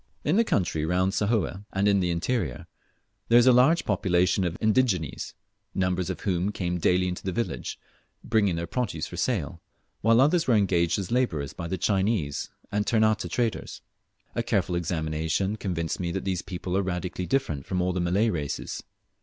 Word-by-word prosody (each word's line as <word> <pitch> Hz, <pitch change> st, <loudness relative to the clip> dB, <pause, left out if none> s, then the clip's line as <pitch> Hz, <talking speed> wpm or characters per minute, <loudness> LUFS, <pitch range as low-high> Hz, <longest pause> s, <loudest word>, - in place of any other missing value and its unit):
In 150 Hz, -, +2 dB
the 230 Hz, -, +5 dB
country 85 Hz, -, 0 dB
round 90 Hz, +3 st, +2 dB
about 105 Hz, -, +1 dB
Sahoe, 105 Hz, -3 st, -1 dB
and 95 Hz, +1 st, +2 dB
in 100 Hz, -1 st, +4 dB
the 90 Hz, -1 st, 0 dB
interior, 85 Hz, -1 st, -1 dB, 0.6 s
there 115 Hz, -, +6 dB
is 120 Hz, -, +6 dB
a 130 Hz, -, +8 dB
large 135 Hz, +8 st, +4 dB
population 95 Hz, -2 st, +2 dB
of 85 Hz, -1 st, -2 dB
indigenes, 110 Hz, -, 0 dB, 0.4 s
numbers 90 Hz, -1 st, 0 dB
of 90 Hz, -3 st, -4 dB
whom 95 Hz, 0 st, 0 dB
came 90 Hz, -3 st, -2 dB
daily 90 Hz, +2 st, +2 dB
into 90 Hz, 0 st, -4 dB
the 95 Hz, -, -3 dB
village, 115 Hz, +5 st, -3 dB, 0.5 s
bringing 105 Hz, -5 st, +2 dB
their 85 Hz, +1 st, -2 dB
produce 120 Hz, +3 st, -2 dB
for -, -, -8 dB
sale, 85 Hz, -, -1 dB, 0.4 s
while 115 Hz, +2 st, +4 dB
others 160 Hz, +5 st, +3 dB
were 120 Hz, -, +4 dB
engaged 90 Hz, -5 st, +2 dB
as 95 Hz, -1 st, -4 dB
labourers 85 Hz, -, 0 dB
by 85 Hz, -, -5 dB
the 95 Hz, -, -2 dB
Chinese 95 Hz, -5 st, 0 dB, 0.2 s
and 105 Hz, 0 st, 0 dB
Ternate 110 Hz, -5 st, +2 dB
traders. 115 Hz, +3 st, -2 dB, 0.5 s
A -, -, 0 dB
careful -, -, 0 dB
examination 80 Hz, +3 st, -1 dB
convinced 85 Hz, -6 st, -3 dB
me 85 Hz, -2 st, -2 dB
that -, -, -3 dB
these 95 Hz, -2 st, -1 dB
people 90 Hz, 0 st, -4 dB
are 100 Hz, -, +3 dB
radically 90 Hz, -1 st, -3 dB
distinct 80 Hz, -, -1 dB
from 90 Hz, -, -1 dB
all 90 Hz, 0 st, +1 dB
the 90 Hz, -, -1 dB
Malay 100 Hz, +6 st, +2 dB
races. 75 Hz, -4 st, -4 dB
95 Hz, 180 wpm, -26 LUFS, 85-110 Hz, 0.6 s, a